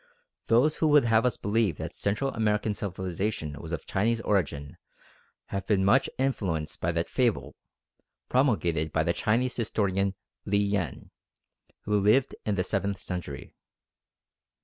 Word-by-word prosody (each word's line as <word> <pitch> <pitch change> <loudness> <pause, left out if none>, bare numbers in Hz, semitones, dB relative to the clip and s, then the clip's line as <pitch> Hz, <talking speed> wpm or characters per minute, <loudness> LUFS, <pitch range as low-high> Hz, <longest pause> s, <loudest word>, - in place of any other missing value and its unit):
Those 130 +7 +3
who 160 - +2
would 150 -3 +5
have 115 +1 +4
us 125 - -1
believe 105 -5 0
that - - -5
Central 105 +7 -1
American 105 -1 +1
civilisation 95 -4 -3
was 80 - -8
of 85 - -4
Chinese 115 +4 +1
origin 80 -10 -1 0.7
have 100 0 -4
been 95 -3 +2
much 130 +7 +4
influenced 95 - -1
by 85 - +1
that 85 0 -1
fable 125 -4 0 0.7
promulgated 85 - +1
by - - +1
the - - +1
Chinese 125 +4 0
historian 100 -4 0 0.3
Li 100 - +1
Yen, 100 -7 -1 0.7
who 105 0 +1
lived 110 +7 +3
in 105 - +1
the 90 - +1
seventh 100 +1 -1
century. 85 -7 -6
100 Hz, 140 wpm, -28 LUFS, 90-115 Hz, 0.7 s, would